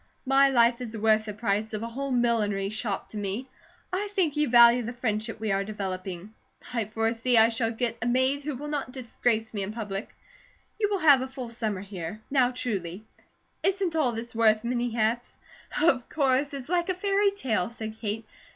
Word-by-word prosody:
My 270 Hz, +1 st, +5 dB
life 235 Hz, -1 st, +3 dB
is 230 Hz, -2 st, -5 dB
worth 215 Hz, 0 st, +3 dB
the 210 Hz, -, -5 dB
price 215 Hz, 0 st, -1 dB
of 215 Hz, -, -4 dB
a -, -, -3 dB
whole 275 Hz, +4 st, -4 dB
millinery 220 Hz, -6 st, +1 dB
shop 215 Hz, -2 st, -3 dB
to 215 Hz, -, -8 dB
me; 205 Hz, +5 st, -3 dB, 0.5 s
I 405 Hz, +3 st, -1 dB
think 345 Hz, -7 st, +1 dB
you 300 Hz, -2 st, +1 dB
value 235 Hz, 0 st, +7 dB
the 235 Hz, +1 st, -5 dB
friendship 225 Hz, -2 st, -2 dB
we 220 Hz, -1 st, -1 dB
are 195 Hz, 0 st, +1 dB
developing; 190 Hz, -1 st, -5 dB, 0.4 s
I 230 Hz, -3 st, 0 dB
foresee 225 Hz, +3 st, +1 dB
I 225 Hz, +1 st, +7 dB
shall 225 Hz, 0 st, 0 dB
get 230 Hz, 0 st, -2 dB
a 235 Hz, -, -1 dB
maid 260 Hz, +3 st, +2 dB
who 295 Hz, -1 st, -4 dB
will 290 Hz, +4 st, -6 dB
not 290 Hz, -3 st, -3 dB
disgrace 230 Hz, -3 st, -1 dB
my 205 Hz, -, -3 dB
in 195 Hz, +1 st, -3 dB
public; 210 Hz, -2 st, -5 dB, 0.7 s
you 415 Hz, -2 st, +2 dB
will 405 Hz, -, +1 dB
have 290 Hz, -7 st, +6 dB
a 260 Hz, -, -3 dB
full 260 Hz, -3 st, -7 dB
summer 215 Hz, -5 st, -3 dB
here; 190 Hz, 0 st, -6 dB
now 260 Hz, -3 st, +4 dB
truly, 205 Hz, -6 st, -4 dB, 0.6 s
isn't 385 Hz, -3 st, 0 dB
all 295 Hz, -6 st, +2 dB
this 230 Hz, +1 st, -6 dB
worth 220 Hz, -1 st, +3 dB
many 240 Hz, 0 st, -1 dB
hats?" 230 Hz, +1 st, -1 dB, 0.4 s
"Of 275 Hz, -6 st, +2 dB
course! 280 Hz, -1 st, +1 dB
It's 265 Hz, -3 st, -7 dB
like 345 Hz, +1 st, 0 dB
a 370 Hz, -, +1 dB
fairy 400 Hz, +2 st, +2 dB
tale," 245 Hz, -, -1 dB
said 220 Hz, -2 st, -7 dB
Kate. 220 Hz, 0 st, -3 dB
235 Hz, 195 wpm, -27 LUFS, 215-265 Hz, 0.7 s, value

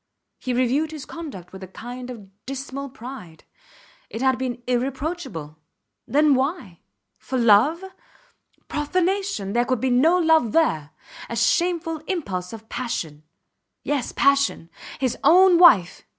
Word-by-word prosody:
He 255 Hz, -, -4 dB
reviewed 255 Hz, +5 st, +1 dB
his 305 Hz, -3 st, -8 dB
conduct 275 Hz, -, -9 dB
with 190 Hz, -, -10 dB
a 190 Hz, -, -8 dB
kind 245 Hz, +6 st, -9 dB
of 225 Hz, -6 st, -9 dB, 0.2 s
dismal 275 Hz, +1 st, -5 dB
pride. 240 Hz, -10 st, -10 dB, 0.7 s
It 230 Hz, -, -5 dB
had 260 Hz, -1 st, +2 dB
been 245 Hz, -2 st, -4 dB
irreproachable. 255 Hz, -, -3 dB, 0.5 s
Then, 295 Hz, +1 st, +4 dB
why? 265 Hz, -, -2 dB, 0.4 s
For 260 Hz, -, -4 dB
love? 240 Hz, -, +4 dB, 0.8 s
Profanation! 345 Hz, -, -1 dB
There 240 Hz, +1 st, +2 dB
could 255 Hz, -2 st, 0 dB
be 260 Hz, +2 st, 0 dB
no 310 Hz, +9 st, +4 dB
love 320 Hz, -9 st, +3 dB
there. 160 Hz, -, +1 dB, 0.4 s
A -, -, -4 dB
shameful 335 Hz, -2 st, +1 dB
impulse 190 Hz, -, -3 dB
of 225 Hz, -1 st, -10 dB
passion. 165 Hz, -14 st, -4 dB, 0.6 s
Yes, 285 Hz, -4 st, -2 dB
passion. 275 Hz, -11 st, +1 dB, 0.3 s
His 260 Hz, -3 st, -2 dB
own 360 Hz, +1 st, +6 dB
wife! 205 Hz, -, +6 dB
260 Hz, 130 wpm, -23 LUFS, 225-315 Hz, 0.8 s, own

